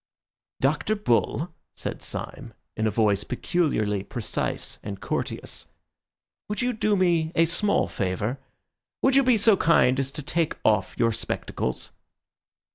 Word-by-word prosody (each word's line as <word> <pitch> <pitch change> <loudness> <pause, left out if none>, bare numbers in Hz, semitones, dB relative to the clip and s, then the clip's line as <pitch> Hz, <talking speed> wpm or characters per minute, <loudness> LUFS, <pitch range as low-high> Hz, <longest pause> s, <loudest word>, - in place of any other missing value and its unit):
"Dr. 150 +10 +1
Bull," 200 - 0 0.2
said - - -4
Syme, - - -6 0.2
in 110 - +1
a - - +3
voice 105 -2 +2
peculiarly 110 - 0
precise 110 +3 -3
and 100 -2 -6
courteous, - - -4 0.8
"would 210 - -2
you 250 0 +1
do 215 -2 +1
me 170 -3 +2
a 165 - +5
small 205 +5 +1
favour? 100 +7 -2 0.6
Would 265 0 +4
you 275 - +7
be 250 -3 +4
so 215 0 +5
kind 150 -7 +4
as 135 0 -1
to 150 - -6
take 160 +3 0
off 105 -3 +2
your 115 0 +3
spectacles?" 65 - -3
150 Hz, 135 wpm, -26 LUFS, -, 0.8 s, you